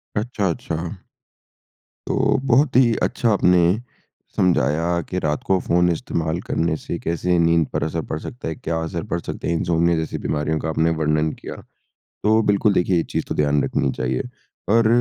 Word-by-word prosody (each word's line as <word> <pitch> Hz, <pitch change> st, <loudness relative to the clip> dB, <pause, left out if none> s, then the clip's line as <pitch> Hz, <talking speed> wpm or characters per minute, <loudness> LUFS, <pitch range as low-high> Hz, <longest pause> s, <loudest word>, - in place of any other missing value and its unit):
अच्छा-अच्छा। 100 Hz, -7 st, -2 dB, 1.3 s
तो, -, -, 0 dB, 0.3 s
बहुत 130 Hz, +2 st, +3 dB
ही 125 Hz, -2 st, +5 dB
अच्छा 120 Hz, -, +1 dB
आपने 90 Hz, -1 st, +4 dB, 0.6 s
समझाया 85 Hz, 0 st, +2 dB
कि 90 Hz, -, -1 dB
रात 75 Hz, -3 st, -1 dB
को 95 Hz, -1 st, +2 dB
फ़ोन 90 Hz, +1 st, +2 dB
इस्तेमाल 80 Hz, 0 st, -2 dB
करने 80 Hz, -1 st, 0 dB
से -, -, -5 dB
कैसे 85 Hz, +1 st, 0 dB
नींद 85 Hz, -2 st, +3 dB
पर 75 Hz, -1 st, 0 dB
असर 80 Hz, +1 st, -2 dB
पड़ 80 Hz, -, -2 dB
सकता 120 Hz, +2 st, -7 dB
है? 80 Hz, -, -3 dB
क्या 80 Hz, +2 st, -3 dB
असर 85 Hz, +1 st, -4 dB
पड़ 85 Hz, -, -1 dB
सकता -, -, -5 dB
है? -, -, +1 dB
इनसोमनिया 85 Hz, 0 st, +1 dB
जैसी 80 Hz, -, -3 dB
बीमारियों 75 Hz, +1 st, -1 dB
का -, -, -3 dB
आपने 80 Hz, +1 st, +1 dB
वर्णन 75 Hz, 0 st, +1 dB
किया। -, -, -7 dB, 0.7 s
तो 110 Hz, +1 st, +4 dB
बिल्कुल 100 Hz, 0 st, +3 dB
देखिए 90 Hz, -1 st, +2 dB
ये 85 Hz, -, +1 dB
चीज़ -, -, -1 dB
तो -, -, -3 dB
ध्यान 75 Hz, -1 st, +2 dB
रखनी 65 Hz, -, 0 dB
चाहिए। 65 Hz, 0 st, -1 dB, 0.5 s
और 115 Hz, -1 st, +5 dB
85 Hz, 170 wpm, -22 LUFS, 80-95 Hz, 1.3 s, ही